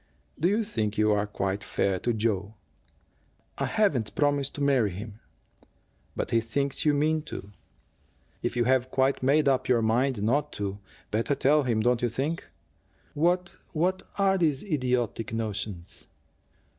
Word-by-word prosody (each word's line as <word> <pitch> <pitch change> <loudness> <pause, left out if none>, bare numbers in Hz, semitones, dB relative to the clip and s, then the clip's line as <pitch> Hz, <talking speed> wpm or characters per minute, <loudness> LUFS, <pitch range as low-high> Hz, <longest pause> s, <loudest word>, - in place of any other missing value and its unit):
"Do 165 - +3
you 210 +4 +2
think 110 - -2
you 105 0 +3
are 105 0 +1
quite 100 -1 -2
fair 95 -3 0
to 120 - 0
Joe?" 105 -2 -1 1.0
"I - - 0
haven't 175 - +1
promised 145 -2 +1
to 145 - -2
marry 135 -7 +3
him." 100 +3 -8 1.0
"But - - -3
he 115 - +3
thinks 140 +6 -2
you 150 -1 +4
mean 155 +2 +2
to. 100 -8 -8 0.9
If 120 - -2
you 120 - +2
have 130 0 +2
quite 135 +1 +1
made 140 +3 +3
up 135 -2 +2
your 120 -3 +3
mind 120 0 +1
not 145 +7 +1
to, 100 0 -4 0.3
better 115 +6 +1
tell 150 +3 +4
him, 120 -5 0
don't 120 +1 +2
you 120 - +1
think? 140 +8 -3 0.6
What 175 +3 +1 0.2
what 185 +4 +1 0.2
are 195 -1 +3
these 150 -5 +1
idiotic 125 - -1
notions?" 105 -5 -5
125 Hz, 155 wpm, -27 LUFS, 110-150 Hz, 1.0 s, you